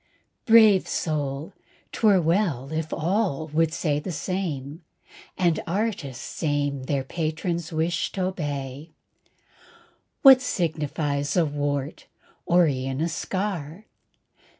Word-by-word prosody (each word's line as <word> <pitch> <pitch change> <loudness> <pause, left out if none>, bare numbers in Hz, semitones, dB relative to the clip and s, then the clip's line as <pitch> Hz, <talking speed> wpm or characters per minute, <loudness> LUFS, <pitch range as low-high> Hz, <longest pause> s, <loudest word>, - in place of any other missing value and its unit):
Brave 220 -4 +6
soul, 150 +1 -2 0.4
'twere 205 -4 +4
well 165 - 0
if 160 0 -3
all 170 -2 0
the 160 +1 +1
same 150 -3 -1
would 185 - -4
say, 170 -3 -3 0.7
And 170 -4 +2
artists 170 - -3
aim 145 -3 -1
their 140 -1 -1
patron's 165 +3 -3
wish 165 +2 -1
t'obey. 145 -6 -4 1.3
What 265 -2 +9
signifies 150 - -1
a 170 - +4
wart, 145 0 -3 0.4
or 175 0 +5
e'en 130 -1 -2
a 165 +2 0
scar? 185 0 -4
160 Hz, 105 wpm, -25 LUFS, 145-180 Hz, 1.3 s, What